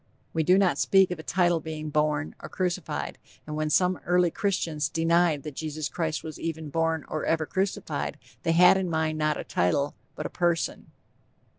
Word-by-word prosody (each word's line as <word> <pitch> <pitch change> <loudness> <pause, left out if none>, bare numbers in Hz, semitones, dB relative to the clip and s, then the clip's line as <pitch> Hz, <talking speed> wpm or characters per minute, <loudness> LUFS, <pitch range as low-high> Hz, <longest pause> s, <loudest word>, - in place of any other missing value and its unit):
We 160 - +1
do 180 +4 +5
not 195 -3 +2
speak 190 -2 +4
of 180 - -4
a - - -7
title 175 -2 +2
being 155 -1 -6
born, 150 0 0
or - - -8
crucified; 180 -2 -3 0.3
and 150 - -5
when 155 0 -1
some 180 +4 +3
early 180 -1 +3
Christians 160 -8 -1
denied 165 -2 +2
that 150 - -6
Jesus 155 -1 -3
Christ 160 -2 -2
was 155 -2 -7
ever 160 -1 -3
born 160 +1 -1
or 155 - -3
ever 160 -1 +1
crucified, 190 +4 -2 0.2
they 165 - +1
had 180 +3 +7
in 190 -2 -1
mind 160 -1 0
not 155 -1 +1
a - - -3
title 140 +12 0 0.2
but - - -5
a - - -2
_person. 175 -2 0
160 Hz, 185 wpm, -27 LUFS, 155-175 Hz, 0.3 s, had